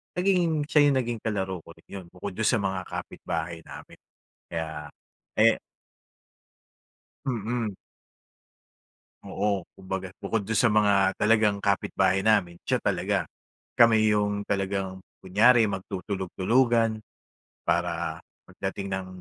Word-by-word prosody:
nagiging 175 -5 +2
siya 150 -3 +5
yung 135 - +1
naging 120 -2 -3
kalaro 95 -4 -2
ko - - -13
rin - - -24
'yon 95 -2 -7
bukod 95 +2 -6
dun 110 - 0
sa - - +4
mga 95 -2 -1
kapitbahay 85 0 -5
namin. - - -11 0.5
Kaya, 80 -2 -5 0.5
eh - - +6 1.7
Mm. 115 -3 -2 1.5
Oo, 100 -4 -1
kumbaga 95 0 -5
bukod 115 - -2
do'n 110 - 0
sa 110 +1 +4
mga 100 -2 +4
talagang 105 -2 +3
kapitbahay 95 -1 +1
namin, 95 -6 +3
siya - - +1
talaga. - - 0 0.5
Kami 115 -2 +6
'yong 105 -1 0
talagang 95 -1 -1 0.2
kunyari 110 +4 +5
magtutulog-tulugan 105 +4 0 0.6
para - - -1 0.3
pagdating 95 0 -5
ng 95 -1 -4
100 Hz, 110 wpm, -26 LUFS, 95-115 Hz, 1.7 s, eh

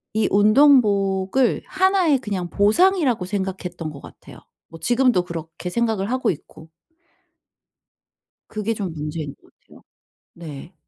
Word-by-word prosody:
이 220 - +2
운동복을 210 -1 +3
하나의 375 -7 +2
그냥 195 -7 -4
보상이라고 250 - +2
생각했던 185 -4 -4
것 140 -2 -10
같아요 - - -14 0.3
뭐 165 - -13
지금도 240 -5 +2
그렇게 170 +1 -7
생각을 220 -2 -1
하고 255 0 0
있고. 160 0 -7 1.8
그게 215 +1 -3
좀 195 -5 -4
문제인 150 -1 -5
것 - - -26
같아요. - - -19 0.5
네. 160 0 -10
200 Hz, 265 characters per minute, -22 LUFS, 175-245 Hz, 1.8 s, 운동복을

